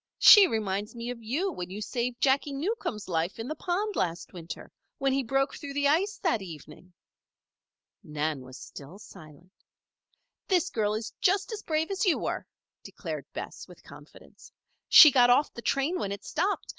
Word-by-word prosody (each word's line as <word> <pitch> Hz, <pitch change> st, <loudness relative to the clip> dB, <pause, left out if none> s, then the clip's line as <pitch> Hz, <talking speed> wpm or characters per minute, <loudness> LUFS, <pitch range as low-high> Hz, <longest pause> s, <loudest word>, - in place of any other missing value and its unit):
She 410 Hz, -3 st, +9 dB
reminds 210 Hz, -, -3 dB
me 235 Hz, +1 st, -5 dB
of 240 Hz, -2 st, -9 dB
you 295 Hz, -, -2 dB
when 180 Hz, -, -6 dB
you 195 Hz, +3 st, -7 dB
saved 240 Hz, +3 st, -3 dB
Jacky 280 Hz, +1 st, +2 dB
Newcomb's 275 Hz, -, -3 dB
life 170 Hz, 0 st, -2 dB
in 225 Hz, +1 st, -6 dB
the 310 Hz, -, -3 dB
pond 385 Hz, +6 st, -2 dB
last 170 Hz, -1 st, -3 dB
winter 170 Hz, -2 st, -9 dB, 0.3 s
when 275 Hz, -1 st, 0 dB
he 275 Hz, -, +1 dB
broke 270 Hz, +2 st, 0 dB
through 280 Hz, -2 st, -8 dB
the 285 Hz, 0 st, +2 dB
ice 370 Hz, +9 st, +1 dB
that 320 Hz, -, +1 dB
evening." 180 Hz, +1 st, -11 dB, 1.1 s
Nan 150 Hz, -5 st, -4 dB
still 135 Hz, +3 st, -11 dB
was 200 Hz, -, -13 dB
silent. 170 Hz, 0 st, -15 dB, 1.0 s
"This 365 Hz, -5 st, +1 dB
girl 210 Hz, -2 st, 0 dB
is 225 Hz, +2 st, -5 dB
just 395 Hz, +4 st, +1 dB
as 435 Hz, -1 st, -5 dB
brave 320 Hz, 0 st, -1 dB
as 385 Hz, -2 st, -1 dB
you 370 Hz, -6 st, +3 dB
were," -, -, -4 dB, 0.3 s
declared -, -, -7 dB
Bess, -, -, -7 dB
with -, -, -16 dB
confidence. -, -, -16 dB, 0.4 s
"She 305 Hz, -, +10 dB
got 245 Hz, -2 st, +5 dB
off 255 Hz, +5 st, +3 dB
the 235 Hz, -, -8 dB
train 280 Hz, +9 st, 0 dB
when 195 Hz, -, -3 dB
it 200 Hz, 0 st, -7 dB
stopped. 380 Hz, +6 st, -2 dB
245 Hz, 175 wpm, -28 LUFS, 195-320 Hz, 1.1 s, She